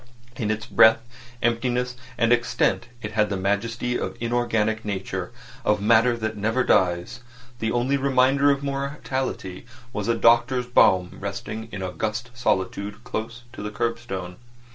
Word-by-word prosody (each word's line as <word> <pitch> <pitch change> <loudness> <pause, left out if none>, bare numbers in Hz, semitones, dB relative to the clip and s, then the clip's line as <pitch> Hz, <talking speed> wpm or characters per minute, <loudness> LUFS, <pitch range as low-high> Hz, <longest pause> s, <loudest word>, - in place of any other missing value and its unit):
In 110 -5 -2
its 110 0 -2
breadth, 110 0 +6 0.4
emptiness, 125 +1 0 0.2
and 115 +1 +4
extent 120 0 +1 0.2
it 105 - -4
had 105 0 +2
the 100 - -1
majesty 110 +5 -1
of - - -4
inorganic 115 -2 0
nature, 95 -1 -4 0.3
of 105 -2 +2
matter 115 +3 +4
that 110 -1 -3
never 110 +5 0
dies. 90 -5 +1 0.4
The 110 0 -1
only 125 +3 +1
reminder 135 +1 +3
of 140 0 +1
mortality 135 -8 -3 0.3
was 105 0 -3
a 115 - +2
doctor's 120 +2 +3
brougham 95 -7 +3
arrested 105 +3 -5
in 95 - -5
august 105 +7 -3
solitude 100 -3 -2
close 115 +2 -5
to - - -8
the 105 - -3
curbstone. 105 -5 -3
115 Hz, 140 wpm, -24 LUFS, 105-120 Hz, 0.4 s, breadth